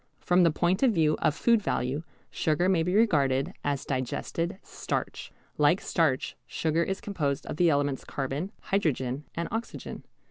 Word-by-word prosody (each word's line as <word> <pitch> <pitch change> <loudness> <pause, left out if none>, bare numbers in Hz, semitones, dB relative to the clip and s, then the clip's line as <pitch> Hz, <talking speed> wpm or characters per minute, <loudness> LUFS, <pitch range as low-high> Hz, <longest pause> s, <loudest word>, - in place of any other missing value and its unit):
From 180 +1 +3
the 170 - +6
point 175 +4 +1
of 260 -4 +4
view 155 -2 +3
of 150 - +2
food 230 +3 +3
value 135 -5 -1 0.3
sugar 160 +3 +1
may 185 -3 +3
be 180 +3 0
regarded 150 - +3
as 140 -2 -1
digested 165 - -2
starch. - - -4 0.3
Like 150 +5 +4
starch, 155 -7 0
sugar 160 +1 0
is 190 +3 -1
composed 150 -9 -2
of - - -5
the 175 0 +4
elements 145 -2 +1
carbon, 140 +7 -3
hydrogen, 145 -7 -1
and 170 0 -2
oxygen. 225 +2 -5
160 Hz, 155 wpm, -28 LUFS, 140-185 Hz, 0.3 s, the